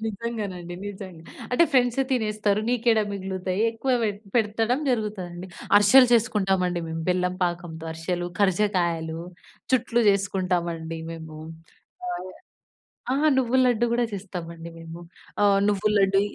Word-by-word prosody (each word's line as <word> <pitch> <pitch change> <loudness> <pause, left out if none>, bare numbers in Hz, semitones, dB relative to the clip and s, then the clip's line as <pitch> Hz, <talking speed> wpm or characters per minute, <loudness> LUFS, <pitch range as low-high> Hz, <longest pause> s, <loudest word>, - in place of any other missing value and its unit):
నిజంగానండి, 205 -5 -5
నిజంగా. 190 -4 -8 0.3
అంటే 295 +7 +5
ఫ్రెండ్స్ 245 -2 +3
తినేస్తారు 215 -4 +1
నీకేడ 235 -2 +2
మిగులుతాయి 190 -1 -3
ఎక్కువ 235 +4 -2
పె 220 - +2 0.3
పెట్టడం 225 +3 +1
జరుగుతుందండి. 195 -7 -3 0.3
అరిశెలు 235 +6 +7
చేసుకుంటామండి 190 -6 +2
మేము, 160 0 -4
బెల్లం 180 0 +1
పాకంతో 175 -2 -4
అరిశెలు, 175 +2 -3
ఖర్జకాయలు. 175 -5 +1 0.5
చుట్లు 240 -1 +2
చేసుకుంటామండి 180 -4 0
మేము. 160 -2 -8 0.7
ఆహ్, 350 - -5 0.8
ఆ! - - +1 0.2
నువ్వుల 260 0 +3
లడ్డు 240 -1 +2
కూడా 240 0 +2
చేస్తామండి 170 -4 -7
మేము. 165 +1 -9 0.4
ఆహ్, 200 -1 +5
నువ్వుల 210 +1 +1
లడ్డు. 195 0 +3
195 Hz, 115 wpm, -25 LUFS, 175-225 Hz, 0.8 s, అరిశెలు